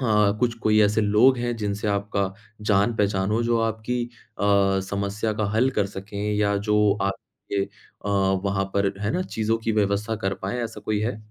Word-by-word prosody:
अ, 130 - -2 0.4
कुछ 120 -1 +2
कोई 110 0 +4
ऐसे 105 +1 +3
लोग 110 +5 +4
हैं 120 0 -1
जिनसे 105 -1 -2
आपका 100 -1 -1 0.3
जान-पहचान 100 -1 +2
हो, 115 +2 +1
जो 115 0 +2
आपकी 115 +2 -1 0.4
अ, 100 -1 +3
समस्या 100 +2 -1
का - - +2
हल 125 +4 +3
कर 100 - +2
सकें 100 +1 -8 0.2
या 100 -1 +2
जो 105 - +4 0.3
आपके 100 0 -3
अ, - - -14 0.8
वहाँ 95 -1 0
पर 100 0 +2
है 105 +1 -1
ना 185 - 0
चीज़ों 110 -8 -1
की 110 - +1
व्यवस्था 105 +1 0
कर 95 -2 -2
पाएँ, 100 +6 -2
ऐसा 110 -2 -7
कोई 105 0 -1
है? 110 0 -1
105 Hz, 180 wpm, -24 LUFS, 100-110 Hz, 0.8 s, कोई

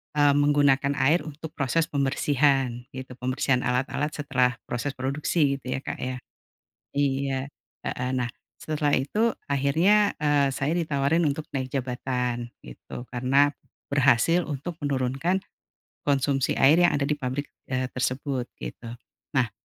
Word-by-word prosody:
eee, 145 -1 +5
menggunakan 145 -1 +3
air 145 +6 +3
untuk 155 +1 -8
proses 160 +3 0
pembersihan 135 -3 +1
gitu, 130 0 -7
pembersihan 130 0 +1
alat-alat 135 +4 0
setelah 130 -4 +1
proses 135 +3 -3
produksi 140 +2 0
gitu 130 - -12
ya, - - -2
Kak, - - -5
ya. 130 0 -3 0.8
Iya. 135 -1 0 0.4
Heeh. 125 +1 -2
Nah, 125 -2 0 0.3
setelah 150 -2 0
itu 215 - +2 0.2
akhirnya, 165 +10 +3
eee, 145 -2 +3
saya 145 +6 -1
ditawarin 160 0 +1
untuk 150 +1 -1
naik 130 -1 -3
jabatan 125 -2 -2
gitu, 120 - -10
karena 135 +4 +2 0.3
berhasil 145 +5 +3
untuk 155 +4 -5
menurunkan 140 +7 0 0.6
konsumsi 140 -1 +1
air 155 +6 +6
yang 175 - +5
ada 140 - 0
di 150 - +1
pabrik, 140 +1 -3 0.2
eee, 130 0 0
tersebut 130 0 -1 0.2
gitu. 115 - -7 0.4
Nah 125 -6 +1
140 Hz, 130 wpm, -26 LUFS, 130-145 Hz, 0.8 s, air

